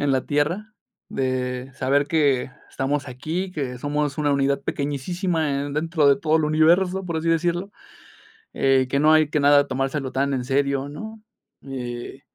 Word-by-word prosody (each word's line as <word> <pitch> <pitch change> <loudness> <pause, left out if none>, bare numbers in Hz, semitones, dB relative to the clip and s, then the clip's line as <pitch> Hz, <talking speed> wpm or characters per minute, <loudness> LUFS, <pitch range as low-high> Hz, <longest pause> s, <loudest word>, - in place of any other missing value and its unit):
en 145 -2 +1
la 130 - +1
tierra, 170 +9 -1 0.4
de 130 0 -2
saber 140 +2 +1
que 140 -5 +1 0.2
estamos 140 +1 -2
aquí, 160 +9 -4
que 135 -7 -4
somos 145 +1 -2
una 145 -1 +2
unidad 140 0 +1
pequeñísisima 145 +1 -1
en 145 - -5
dentro 160 -1 +1
de 140 - +5
todo 155 0 +2
el 155 - +1
universo, 175 +5 +3
por 170 -2 -3
así 160 +1 -2
decirlo, 175 +4 0 0.8
eh, 135 -1 +2
que 140 +1 +1
no 155 +1 +5
hay 155 -1 +4
que 150 - 0
nada 145 0 +5
tomárselo 135 0 -2
tan 140 +1 0
en 125 - -1
serio, 140 0 0
¿no? 220 +9 -8 0.4
Eh, 125 0 -6
145 Hz, 165 wpm, -23 LUFS, 135-160 Hz, 0.8 s, de